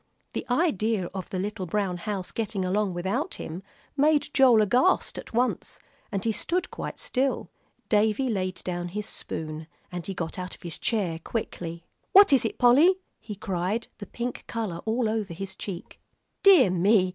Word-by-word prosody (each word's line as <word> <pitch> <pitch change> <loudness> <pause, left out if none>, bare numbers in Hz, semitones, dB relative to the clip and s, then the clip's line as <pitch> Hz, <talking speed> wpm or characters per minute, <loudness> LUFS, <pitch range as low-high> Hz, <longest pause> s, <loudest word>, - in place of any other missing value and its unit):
The - - -4
idea 225 - +1
of 190 -2 -5
the 185 - -3
little 195 0 -3
brown 190 0 -1
house 195 0 -4
getting 210 -4 -2
along 195 0 0
without 215 - -2
him 165 +4 -6 0.3
made 295 +1 +3
Joel 250 -5 +6
aghast 250 - +2
at - - -10
once, 245 +2 -1 0.3
and 195 +1 -2
he 225 - +3
stood 345 - -1
quite - - -5
still. 265 +1 -1 0.4
Davie 220 +4 +2
laid 185 -3 -2
down 175 -1 -3
his 210 +4 -4
spoon, 155 -5 -5 0.2
and 175 -1 -4
got 165 +1 -4
out 180 0 -5
of - - -21
his 170 -3 -4
chair 185 -8 0
quickly. 170 -4 -5 0.3
"What 400 -6 +8
is 260 -4 +4
it, - - -2
Polly?" 280 +10 +6 0.2
he 210 -2 -7
cried, 190 +3 -2
the 205 - -7
pink 240 +1 -4
color 215 -7 -3
all 225 +1 +1
over 215 -5 -2
his 195 +1 -5
cheek. 190 -3 -7 0.4
"Dear 360 - +7
me!" 185 +2 +4
210 Hz, 170 wpm, -27 LUFS, 180-240 Hz, 0.4 s, What